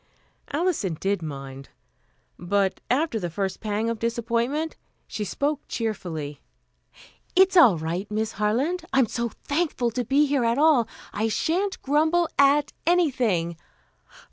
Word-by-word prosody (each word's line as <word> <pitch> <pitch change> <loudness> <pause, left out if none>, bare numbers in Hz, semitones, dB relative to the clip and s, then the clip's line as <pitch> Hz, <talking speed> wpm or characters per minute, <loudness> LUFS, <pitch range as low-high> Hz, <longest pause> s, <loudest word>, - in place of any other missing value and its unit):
Alison 290 - 0
did 195 -1 0
mind; 135 -3 -7 0.7
but 190 +2 0
after 260 -2 +1
the 175 -3 -3
first 190 +2 -3
pang 215 +1 -2
of 230 -1 -2
disappointment, 235 +7 -1 0.3
she 210 - -4
spoke 280 +9 -1
cheerfully. 165 -10 -4 0.9
"It's 380 +1 +5
all 245 - +7
right, 170 +6 -3
Miss 215 +1 -1
Harland. 255 - 0
I'm 265 -2 +5
so 235 +1 -2
thankful 285 -6 0
to 245 +2 -2
be 275 +5 +3
here 280 -3 +1
at 230 +1 +1
all, 290 -6 +4 0.3
I 215 +2 0
shan't 365 - -1
grumble 315 +4 +2
at 280 +1 +4
anything. 245 - +1
235 Hz, 130 wpm, -25 LUFS, 200-295 Hz, 0.9 s, all